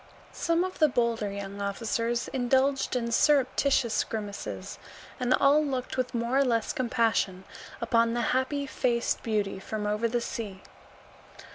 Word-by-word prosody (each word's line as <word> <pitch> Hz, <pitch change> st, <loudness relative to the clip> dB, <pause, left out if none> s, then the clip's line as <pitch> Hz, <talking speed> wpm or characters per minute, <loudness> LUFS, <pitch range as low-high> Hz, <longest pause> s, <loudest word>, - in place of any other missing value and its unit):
Some 335 Hz, +1 st, +1 dB
of 370 Hz, 0 st, -5 dB
the 310 Hz, -, +6 dB
bolder 235 Hz, -5 st, 0 dB
young 200 Hz, 0 st, -6 dB
officers 230 Hz, +4 st, -1 dB
indulged 265 Hz, +2 st, +1 dB
in 235 Hz, -1 st, -1 dB
surreptitious 265 Hz, -3 st, +3 dB
grimaces, 200 Hz, -, -6 dB, 0.4 s
and 250 Hz, 0 st, -1 dB
all 290 Hz, +2 st, +4 dB
looked 260 Hz, -3 st, -3 dB
with 255 Hz, -1 st, -2 dB
more 235 Hz, +3 st, +1 dB
or -, -, +5 dB
less 230 Hz, -4 st, 0 dB
compassion 230 Hz, -6 st, 0 dB, 0.4 s
upon 230 Hz, 0 st, +2 dB
the 240 Hz, -, 0 dB
happy 270 Hz, +2 st, 0 dB
faced 240 Hz, -3 st, 0 dB
beauty 205 Hz, -4 st, -1 dB
from 210 Hz, +2 st, -4 dB
over 210 Hz, +2 st, 0 dB
the 240 Hz, +1 st, 0 dB
sea. 210 Hz, -5 st, -6 dB
235 Hz, 140 wpm, -28 LUFS, 215-260 Hz, 0.4 s, the